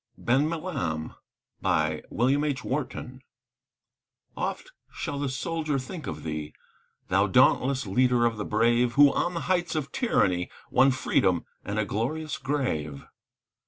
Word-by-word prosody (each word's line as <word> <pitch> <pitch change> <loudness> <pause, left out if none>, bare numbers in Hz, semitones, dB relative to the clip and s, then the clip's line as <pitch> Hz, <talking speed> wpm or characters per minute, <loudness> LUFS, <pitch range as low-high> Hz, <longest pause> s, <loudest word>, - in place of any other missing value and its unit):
BEN 135 +6 +2
MILAM 140 - -3 0.5
Oft - - +1 2.9
shall 145 -4 -4
the 140 -1 -1
soldier 155 +3 -2
think 150 +6 -6
of 75 -1 -5
thee, 75 -1 -4 0.6
Thou 95 +2 +3
dauntless 130 +4 +3
leader 125 +4 +3
of 115 -2 0
the 105 - -3
brave, 120 +3 +2
Who 140 +1 +6
on 175 - 0
the 170 - -2
heights 175 -3 0
of 150 -3 -2
Tyranny 90 - +1 0.2
Won 135 - +5
Freedom 95 -9 +1 0.2
and 100 +1 -4
a 110 - +1
glorious 140 +8 -3
grave. 80 - -2
125 Hz, 120 wpm, -27 LUFS, 100-150 Hz, 2.9 s, Who